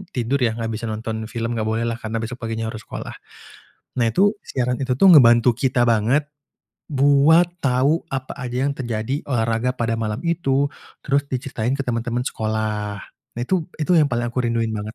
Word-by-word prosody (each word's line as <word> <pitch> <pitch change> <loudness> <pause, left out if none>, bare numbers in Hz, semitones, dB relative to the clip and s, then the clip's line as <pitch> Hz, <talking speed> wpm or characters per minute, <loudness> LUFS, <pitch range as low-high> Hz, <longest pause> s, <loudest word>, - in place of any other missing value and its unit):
tidur, 125 +3 0
ya 115 -2 +1
enggak 115 -1 -3
bisa 115 +2 -5
nonton 110 0 -4
film, 115 +1 -3
enggak 110 - -1
boleh 110 +1 0
lah, 115 -1 -2
karena 110 0 -4
besok 120 +2 -6
paginya 115 0 -3
harus 110 -1 -8
sekolah. - - -6 0.9
Nah, 120 - +3
itu 200 - +3
siaran 125 -1 -1
itu 130 -1 0
tuh 195 - +6
membantu 120 -6 +7
kita 125 0 +1
banget 120 +6 +2 0.6
buat 145 +4 +4
tahu 140 +5 +2
apa 130 -1 -4
aja 125 0 -3
yang - - -1
terjadi 120 +2 -3
olahraga 115 -1 0
pada 115 -2 -1
malam 110 0 -2
itu, 140 -4 +1 0.3
terus 140 0 0
diceritain 125 -1 -2
ke - - 0
teman-teman 120 0 -1
sekolah. 110 -2 -2 0.4
Nah, - - -3
itu 170 +5 0
itu 155 - -1
yang 150 - +5
paling 120 0 -1
aku 120 - -4
rinduin 115 -1 0
banget. 105 +1 -5
120 Hz, 180 wpm, -21 LUFS, 115-135 Hz, 0.9 s, membantu